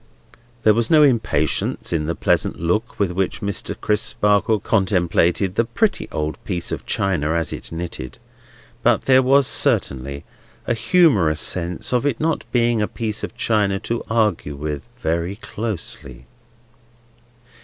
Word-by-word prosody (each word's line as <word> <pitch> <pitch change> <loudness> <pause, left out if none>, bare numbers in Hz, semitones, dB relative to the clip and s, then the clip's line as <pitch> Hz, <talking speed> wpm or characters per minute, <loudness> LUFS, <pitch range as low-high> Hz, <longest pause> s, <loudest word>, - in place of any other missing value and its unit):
There 110 - +6
was 115 +1 0
no 155 -2 +6
impatience 110 - +1
in 75 -2 -1
the 85 - -1
pleasant - - 0
look 90 +8 -1
with 100 -3 +1
which 95 +1 -2
Mr. 100 -1 -3
Crisparkle 105 0 +1
contemplated 95 -2 +1
the 115 - +2
pretty 155 - 0
old 75 0 -3
piece 90 -4 -3
of - - -5
china 85 -6 0
as 85 -1 -1
it - - -8
knitted; 80 -6 -6 0.6
but - - +3
there 130 0 +5
was, 135 +2 +4
certainly, 70 - 0 0.4
a - - +1
humorous 115 - +3
sense 90 +6 -1
of 125 - +2
its 130 -5 -1
not 160 0 -1
being 120 -2 +2
a 105 - +1
piece 110 -2 -4
of - - -6
china 105 -3 +1
to 115 +1 -2
argue 105 -10 0
with 75 +2 -5
very 85 -2 -2
closely. 100 - -5
100 Hz, 145 wpm, -21 LUFS, 85-115 Hz, 0.6 s, There